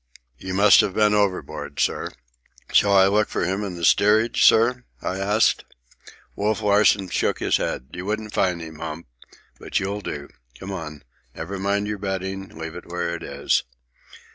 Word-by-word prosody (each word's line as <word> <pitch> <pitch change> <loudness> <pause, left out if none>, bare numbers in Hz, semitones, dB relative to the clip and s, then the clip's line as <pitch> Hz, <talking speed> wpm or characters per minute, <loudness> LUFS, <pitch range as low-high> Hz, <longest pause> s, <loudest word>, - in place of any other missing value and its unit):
"You 95 0 -5
must 100 +2 +7
have 95 - -3
been 105 -1 +3
overboard, 100 -3 -1
sir." - - 0 0.6
"Shall 100 - +4
I 95 -1 +6
look 105 +2 +2
for - - -1
him 95 +4 -2
in 95 -3 -5
the 85 -1 -2
steerage, 110 +6 +3
sir?" 125 +3 +4 0.2
I 95 - -4
asked. 105 +3 +2 0.7
Wolf 105 +1 -1
Larsen 100 -2 +3
shook - - 0
his - - +1
head. 65 - -4
"You 90 +1 -6
wouldn't 110 0 -3
find 90 -3 0
him, 80 -1 -9
Hump. 80 0 -6 0.5
But - - -2
you'll 100 +1 -3
do. 75 -6 -6 0.3
Come 95 - -7
on. 80 -5 -7 0.3
Never 95 +4 -6
mind 100 +1 0
your 105 -1 -4
bedding. 95 0 -4
Leave 80 -5 -8
it 90 - -10
where 85 0 -3
it 85 - -6
is." - - 0
95 Hz, 170 wpm, -23 LUFS, 90-105 Hz, 0.7 s, must